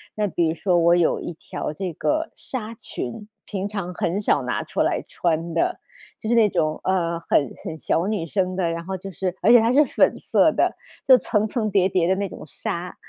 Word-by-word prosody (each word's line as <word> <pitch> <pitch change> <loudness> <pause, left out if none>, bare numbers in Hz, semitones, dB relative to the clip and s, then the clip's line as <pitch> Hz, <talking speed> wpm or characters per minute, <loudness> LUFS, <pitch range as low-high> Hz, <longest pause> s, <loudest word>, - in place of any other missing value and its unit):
那 210 -1 0
比 170 -2 0
如 160 - -1
说 180 0 +1
我 170 +1 +5
有 175 -2 +2
一 175 - -5
条 155 - -6
这 185 +2 -4
个 315 - -1
纱 230 -3 -5
裙， 205 - -6 0.2
平 195 0 -3
常 195 -4 -5
很 180 +5 -1
少 145 - +2
拿 125 - -2
出 - - -2
来 - - +1
穿 165 -1 -1
的， - - 0 0.4
就 220 - -5
是 235 - +3
那 220 -2 +6
种， 155 -3 0
呃， 170 -3 0
很 140 -5 +1
很 160 - -4
小 165 +3 0
女 210 -6 -1
生 185 +1 -1
的， 175 -3 0
然 170 0 -5
后 190 0 -3
就 195 +2 -8
是 185 0 -3
而 220 +6 +5
且 240 - +9
它 230 +3 +2
是 295 +2 +6
粉 - - +2
色 - - +3
的， - - +1 0.3
就 260 -1 +9
层 215 -2 +1
层 215 -1 -1
叠 190 -1 +3
叠 175 -2 +1
的 190 - +3
那 200 -1 -2
种 - - -10
纱。 175 +1 -5
185 Hz, 240 characters per minute, -23 LUFS, 170-210 Hz, 0.4 s, 且